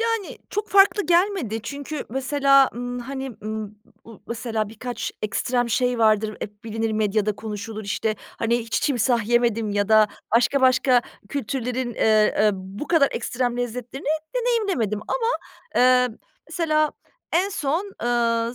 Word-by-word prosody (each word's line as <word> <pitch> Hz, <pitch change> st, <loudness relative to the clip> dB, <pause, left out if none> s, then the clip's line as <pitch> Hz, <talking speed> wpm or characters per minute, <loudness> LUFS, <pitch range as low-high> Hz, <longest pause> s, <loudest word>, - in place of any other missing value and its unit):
Yani, 455 Hz, -3 st, -1 dB
çok 420 Hz, +1 st, -3 dB
farklı 400 Hz, +1 st, +5 dB
gelmedi 340 Hz, -, +1 dB
çünkü 285 Hz, +4 st, -5 dB
mesela, 275 Hz, +2 st, +3 dB
ımm, 245 Hz, +1 st, -4 dB
hani, 265 Hz, +1 st, -5 dB
ımm, 215 Hz, -1 st, -5 dB, 0.3 s
m 230 Hz, -, -11 dB
mesela, 225 Hz, -2 st, -2 dB
birkaç 245 Hz, +3 st, -5 dB
ekstrem 245 Hz, +3 st, 0 dB
şey 250 Hz, +1 st, +1 dB
vardır, 215 Hz, -1 st, +2 dB
hep 205 Hz, +1 st, -8 dB
bilinir, 225 Hz, 0 st, -2 dB
medyada 215 Hz, 0 st, +1 dB
konuşulur, 215 Hz, 0 st, -6 dB
işte, 215 Hz, +2 st, -1 dB, 0.2 s
hani, 235 Hz, +1 st, +1 dB
hiç 230 Hz, -1 st, -2 dB
timsah 240 Hz, -5 st, +1 dB
yemedim 235 Hz, -3 st, +2 dB
ya 205 Hz, 0 st, 0 dB
da 215 Hz, -1 st, +6 dB, 0.3 s
başka 245 Hz, +4 st, +3 dB
başka 255 Hz, -1 st, +4 dB, 0.3 s
kültürlerin, 250 Hz, -1 st, -3 dB
ııı, 215 Hz, -1 st, +3 dB
e, -, -, +4 dB
bu 190 Hz, +8 st, -7 dB
kadar 315 Hz, -5 st, +4 dB
ekstrem 245 Hz, -1 st, -2 dB
lezzetlerini 245 Hz, +2 st, -5 dB, 0.3 s
deneyimlemedim 395 Hz, -, 0 dB
ama, 465 Hz, -2 st, 0 dB, 0.5 s
ııı, 250 Hz, -2 st, +4 dB, 0.3 s
mesela 310 Hz, -2 st, +1 dB, 0.4 s
en 365 Hz, +4 st, +3 dB
son, 365 Hz, +2 st, -2 dB
ııı, 235 Hz, -1 st, +1 dB
240 Hz, 135 wpm, -23 LUFS, 220-275 Hz, 0.5 s, da